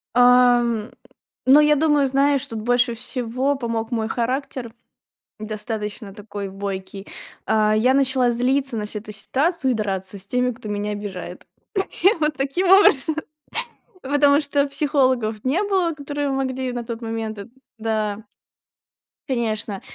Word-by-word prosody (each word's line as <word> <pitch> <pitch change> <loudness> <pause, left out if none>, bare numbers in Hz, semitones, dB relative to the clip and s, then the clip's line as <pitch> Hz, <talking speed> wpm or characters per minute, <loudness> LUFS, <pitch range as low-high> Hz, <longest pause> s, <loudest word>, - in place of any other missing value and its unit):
Ам. 245 -2 +4 0.6
Но 275 +3 +7
я 300 0 +5
думаю, 295 -2 +3
знаешь, 275 +1 +2
что 265 -4 -6
тут 215 - -5
больше 245 -1 +2
всего 250 +3 -1
помог 230 -3 -3
мой 225 -2 -1
характер. 245 0 -3 0.7
Достаточно 215 -1 -5
такой 205 -1 -6
бойкий. 195 0 -6 0.4
А, 215 -1 +3
я 250 +4 +3
начала 260 -2 +2
злиться 255 +1 0
на 210 - -3
всю 210 0 -5
эту 210 0 -10
ситуацию 270 - 0
и - - 0
драться 195 -2 -3
с 190 - -9
теми, 250 +2 +1
кто 230 -3 -9
меня 205 0 -2
обижает. 205 -3 -7 0.6
Я 390 +5 +5
вот 300 0 +1
таким 275 +8 -1
образом. 320 -6 +5 0.9
Потому 285 +1 +4
что 285 -1 +1
психологов 260 -7 +1
не 295 +10 +1
было, 380 -5 +1
которые 290 0 -3
могли 260 -1 -2
на 240 -1 -4
тот 230 -1 -6
момент 225 -1 -4
и 200 - -7 0.3
да 215 -1 -2 1.1
Конечно, 220 -5 -2
245 Hz, 140 wpm, -22 LUFS, 215-275 Hz, 1.1 s, Но